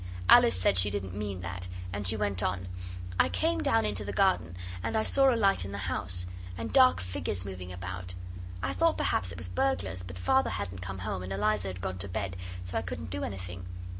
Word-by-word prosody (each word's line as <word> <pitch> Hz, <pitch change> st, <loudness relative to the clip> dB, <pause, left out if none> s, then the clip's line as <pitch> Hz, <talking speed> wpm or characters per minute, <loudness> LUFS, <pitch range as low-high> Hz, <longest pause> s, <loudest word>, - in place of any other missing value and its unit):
Alice 90 Hz, -, +7 dB
said 95 Hz, 0 st, +4 dB
she 95 Hz, +3 st, +4 dB
didn't 95 Hz, -2 st, -3 dB
mean 100 Hz, -2 st, -3 dB
that, 90 Hz, +1 st, -5 dB, 0.3 s
and 100 Hz, -1 st, -2 dB
she 110 Hz, -, +2 dB
went 100 Hz, -3 st, 0 dB
on 95 Hz, 0 st, -1 dB, 0.5 s
'I -, -, +5 dB
came 95 Hz, +5 st, +1 dB
down 110 Hz, +1 st, +3 dB
into 105 Hz, -1 st, 0 dB
the 100 Hz, -, -4 dB
garden, 95 Hz, -, +2 dB, 0.2 s
and 220 Hz, -, -1 dB
I 220 Hz, -, +3 dB
saw 270 Hz, +2 st, +4 dB
a 235 Hz, -, +2 dB
light 195 Hz, -, +4 dB
in 95 Hz, -, -5 dB
the -, -, -3 dB
house, 90 Hz, -2 st, -2 dB, 0.3 s
and 115 Hz, -, -4 dB
dark 260 Hz, -1 st, +7 dB
figures 90 Hz, 0 st, -3 dB
moving 90 Hz, -2 st, -6 dB
about. 90 Hz, 0 st, -5 dB, 0.5 s
I 90 Hz, 0 st, 0 dB
thought 90 Hz, -, +3 dB
perhaps 95 Hz, 0 st, +1 dB
it 100 Hz, -, -7 dB
was 90 Hz, +1 st, -3 dB
burglars, 90 Hz, +1 st, 0 dB
but 90 Hz, 0 st, -8 dB
Father 90 Hz, +9 st, +3 dB
hadn't 90 Hz, 0 st, -4 dB
come 95 Hz, +1 st, -5 dB
home, 95 Hz, 0 st, -3 dB
and 90 Hz, +1 st, -6 dB
Eliza 105 Hz, 0 st, +1 dB
had 90 Hz, -1 st, -5 dB
gone 95 Hz, -1 st, -3 dB
to 100 Hz, -, -3 dB
bed, 95 Hz, 0 st, -3 dB, 0.3 s
so 90 Hz, -, -1 dB
I -, -, -3 dB
couldn't -, -, -5 dB
do 95 Hz, 0 st, -1 dB
anything. 95 Hz, -1 st, -5 dB
95 Hz, 220 wpm, -30 LUFS, 90-100 Hz, 0.5 s, Alice